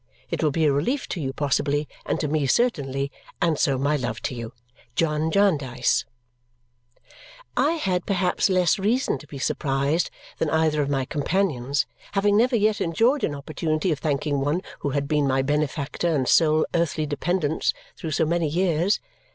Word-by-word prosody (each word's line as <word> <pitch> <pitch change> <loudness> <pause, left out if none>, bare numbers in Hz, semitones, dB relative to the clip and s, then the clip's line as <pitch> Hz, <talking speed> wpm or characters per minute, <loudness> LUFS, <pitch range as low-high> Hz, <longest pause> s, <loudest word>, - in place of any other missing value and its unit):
It - - -1
will 155 - +3
be 160 +2 +1
a 145 - +4
relief 245 - 0
to 175 - -3
you 135 -2 -2
possibly, 145 +1 0 0.2
and - - 0
to 150 - 0
me 150 -1 0
certainly, 140 - +1 0.3
and 165 -3 +1
so 135 -2 +2
my 140 +3 +1
love 125 -4 -3
to - - -2
you. 115 -2 -6 0.4
John 155 -1 +1
Jarndyce 145 -11 +2 1.5
I 305 - +3
had 190 - -1
perhaps 190 -1 +1
less 185 +1 +3
reason 230 +7 +1
to 150 - -14
be 140 - -8
surprised 140 +4 0 0.3
than 160 - +1
either 160 -1 +2
of 140 - -1
my 135 -2 0
companions, 145 -4 0 0.3
having 205 0 +3
never 240 +4 +3
yet 215 -1 +2
enjoyed 230 - +2
an 145 - 0
opportunity 155 +4 -1
of 150 - -1
thanking 145 -1 0
one 150 +7 0 0.2
who 145 - -2
had 140 +1 -1
been 150 -2 +2
my 135 0 +2
benefactor 150 +3 -1
and 145 -6 +1
sole 155 -1 +4
earthly 165 -2 0
dependence 155 +1 0 0.2
through 160 - -5
so 155 +1 +1
many 170 0 +1
years. 175 +3 +1
155 Hz, 170 wpm, -24 LUFS, 140-180 Hz, 1.5 s, a